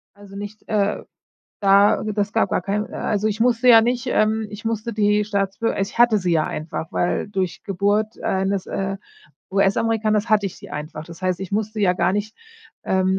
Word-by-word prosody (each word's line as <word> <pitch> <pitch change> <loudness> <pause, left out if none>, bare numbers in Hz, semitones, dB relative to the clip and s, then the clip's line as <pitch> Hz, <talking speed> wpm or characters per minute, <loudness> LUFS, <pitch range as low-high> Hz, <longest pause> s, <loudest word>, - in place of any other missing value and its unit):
Also, 200 -1 -14
nicht, 205 +1 -8
äh 205 -1 0 0.6
da 200 +1 +5
das 210 -1 -2
gab - - +2
gar - - 0
keinen. 205 +2 -2
Äh, - - -8
also, 210 0 0
ich 215 0 -2
musste 240 +1 +2
ja 230 -2 +9
nicht, 245 +2 -1
ähm 220 -2 +1
ich 210 +1 -10
musste 225 +1 -2
die 210 0 +2
Staatsbür 200 +2 -1
ich 195 +3 -3
hatte 240 -2 +6
sie 180 -3 -1
ja 160 -2 +2
einfach, 155 +1 -5
weil 175 - 0
durch 190 -3 -3
Geburt 205 +3 0
eines, 190 0 -1
äh, 195 0 -3 0.5
US-Amerikaners 215 +2 +1
hatte 210 -2 +3
ich 185 - -10
sie - - -12
einfach. 155 +1 -6
Das 170 +2 -12
heißt, 185 -1 0
ich 190 - -6
musste 215 +1 -2
ja 190 -3 +4
gar 185 - +1
nicht, 210 +2 -3 0.5
ähm, 190 0 +1
205 Hz, 190 wpm, -22 LUFS, 195-215 Hz, 0.6 s, ja